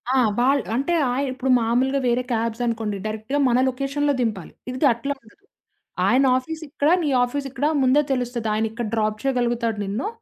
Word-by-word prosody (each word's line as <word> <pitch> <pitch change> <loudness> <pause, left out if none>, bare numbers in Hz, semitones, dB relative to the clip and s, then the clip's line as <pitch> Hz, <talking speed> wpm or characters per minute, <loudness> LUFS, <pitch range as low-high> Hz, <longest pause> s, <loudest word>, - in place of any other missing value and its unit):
ఆ! - - +4 0.2
వాళ్ళు 270 +2 +3
అంటే, 275 +8 0 0.2
ఆహ్, 270 +3 0
ఇప్పుడు 260 +1 -3
మామూలుగా 255 +4 +1
వేరే 245 +1 +2
క్యాబ్స్ 230 +1 -1
అనుకోండి. 220 -3 -2
డైరెక్ట్‌గా 220 +6 -2
మన 245 +1 +3
లొకేషన్‌లో 275 +3 -1
దింపాలి. 210 -7 -3 0.2
ఇది 255 +3 0
అట్లా 275 +5 -3
ఉండదు. 225 - -21 0.7
ఆయన 260 +3 +4
ఆఫీసు 320 +5 -5
ఇక్కడ, 290 +1 0
నీ 295 - 0
ఆఫీసు 275 +3 -2
ఇక్కడ 270 +2 -2 0.2
ముందే 260 +3 +4
తెలుస్తది. 245 -3 -2
ఆయన 220 +1 +1
ఇక్కడ 230 -1 -4
డ్రాప్ 215 -1 0
చేయగలుగుతాడు 240 -4 0
నిన్ను. 210 - -3
245 Hz, 170 wpm, -23 LUFS, 230-275 Hz, 0.7 s, ఆ